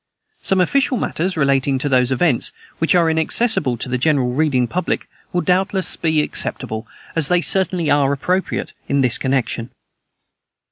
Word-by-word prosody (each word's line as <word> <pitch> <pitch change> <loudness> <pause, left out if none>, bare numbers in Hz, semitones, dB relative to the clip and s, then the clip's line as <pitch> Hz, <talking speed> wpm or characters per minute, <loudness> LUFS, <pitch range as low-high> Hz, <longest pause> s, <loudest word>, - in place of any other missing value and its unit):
Some 195 - +1
official 265 +8 +2
matters 180 -3 -2
relating 135 -2 +2
to 140 - -1
those 130 -2 +2
events, 130 -1 +2 0.3
which 165 +2 +2
are 170 -2 +4
inaccessible 160 - +2
to 115 - -5
the 125 0 -2
general 130 -4 +1
reading 140 -3 +1
public, 180 +8 -2 0.2
will 175 - 0
doubtless 190 +1 0
be 160 -2 +1
acceptable, 110 -5 -4 0.3
as 165 -4 +3
they 180 +1 +2
certainly 180 -4 +1
are 140 -1 +3
appropriate, 180 +7 -2
in 140 0 +1
this 125 -3 +3
connection. 130 -3 -1
150 Hz, 150 wpm, -19 LUFS, 130-180 Hz, 0.3 s, are